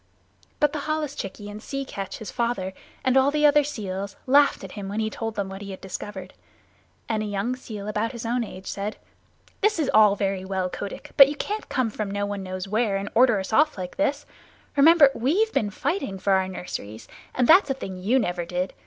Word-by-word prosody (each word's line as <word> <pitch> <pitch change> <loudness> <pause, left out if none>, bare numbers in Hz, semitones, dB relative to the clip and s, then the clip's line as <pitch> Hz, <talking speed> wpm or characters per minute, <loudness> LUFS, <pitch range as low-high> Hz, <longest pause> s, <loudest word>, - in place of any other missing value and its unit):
But 295 -1 +3
the 305 - -2
holluschickie 285 -10 -3
and 205 +1 -8
Sea 275 +3 -4
Catch, 195 -6 -6
his 220 - -7
father, 235 -6 -1 0.3
and 260 -1 +2
all 265 +1 +5
the 300 +1 +2
other 295 0 +6
seals 200 -7 -5
laughed 280 -2 +4
at 190 - -8
him 200 -2 -6
when 205 +2 -3
he 220 0 -1
told 225 0 -4
them 200 -2 -2
what 195 +1 -8
he 200 - -7
had 190 - -7
discovered, 190 +1 -7 0.7
and 220 -2 0
a - - -2
young 205 +5 -1
seal 215 -5 -8
about 210 +2 -1
his 235 -2 -7
own 240 +1 0
age 190 -3 -9
said, 205 +2 -4 0.6
"This 425 0 +3
is 310 -4 0
all 210 -2 +6
very 195 -1 -1
well, 190 -1 -2
Kotick, 200 - -7
but 275 - +11
you 295 - -4
can't 420 +8 -4
come 255 -5 0
from 210 -1 -4
no 205 +1 -1
one 205 -1 -4
knows 185 0 -5
where 215 -1 +1
and 200 +1 -4
order 240 -3 +5
us 190 +3 -5
off 300 +2 +4
like 180 +4 -6
this. 290 0 0 0.5
Remember 295 0 +7
we've 355 - +1
been 210 - +1
fighting 205 - -2
for 195 +1 +1
our 190 0 +2
nurseries, 115 - -7 0.3
and 250 -1 +2
that's 360 0 +7
a 270 - 0
thing 190 -8 -6
you 225 +8 +2
never 180 -7 0
did. 180 +2 -3
215 Hz, 215 wpm, -25 LUFS, 195-270 Hz, 0.7 s, but